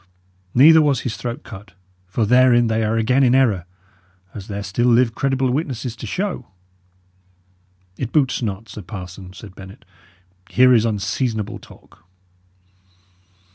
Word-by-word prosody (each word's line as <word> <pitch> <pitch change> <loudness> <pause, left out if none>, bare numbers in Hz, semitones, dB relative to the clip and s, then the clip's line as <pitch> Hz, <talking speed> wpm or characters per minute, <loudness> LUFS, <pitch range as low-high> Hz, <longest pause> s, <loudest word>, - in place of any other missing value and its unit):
Neither 160 +5 +7
was 145 -4 +1
his 120 -4 -4
throat 120 +3 -6
cut; 100 -4 -12 0.3
for 110 +5 -1
therein 125 +1 +4
they 110 0 0
are 110 +1 0
again 125 +4 +2
in 130 -1 +4
error, 110 -10 +2 0.7
as 100 -3 -9
there 100 -1 -5
still 100 +5 -1
live 120 -1 +3
credible 135 -1 0
witnesses 130 -4 -3
to 115 - -7
show." 180 - -4 1.5
"It 125 -3 -4
boots 140 -5 +1
not, 105 -1 -4
sir 105 - -9
parson," 90 -1 -9
said 100 -1 -12
Bennet. 95 0 -13 0.6
"Here 125 0 +5
is 115 -2 +3
unseasonable 110 +1 -2
talk." - - -19
115 Hz, 135 wpm, -20 LUFS, 105-130 Hz, 1.5 s, Neither